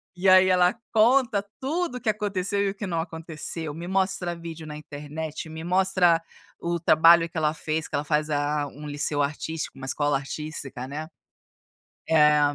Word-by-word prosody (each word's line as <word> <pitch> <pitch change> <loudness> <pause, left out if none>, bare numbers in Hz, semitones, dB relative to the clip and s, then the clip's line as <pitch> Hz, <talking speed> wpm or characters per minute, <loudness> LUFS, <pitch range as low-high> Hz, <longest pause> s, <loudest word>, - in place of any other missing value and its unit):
E 190 +2 +2
aí, 185 0 +7
ela 180 +1 +4 0.2
conta 230 -2 +4 0.2
tudo 310 +1 -2
o - - -4
que 250 - -9
aconteceu 205 -2 0
e 200 - +1
o 195 - -5
que 205 - -5
não 170 -3 -1
aconteceu. 160 -1 -5
Me 170 +2 -7
mostra 190 -2 0
vídeo 165 -2 -8
na 150 - -7
internet, 150 +2 -7
me 160 0 -7
mostra 180 -2 +3 0.4
o 170 0 -2
trabalho 165 +1 +6
que 165 - -27
ela 155 -1 +2
fez, 160 0 -3
que - - -5
ela 145 - 0
faz, 150 0 0
ah, 145 0 0
um 150 +2 -10
liceu 145 0 0
artístico, 155 +2 -4
uma 130 0 -7
escola 145 +1 +1
artística, 135 -2 -6
né. 150 +3 -5 1.0
Eh, 150 -2 +5
165 Hz, 175 wpm, -25 LUFS, 150-185 Hz, 1.0 s, aí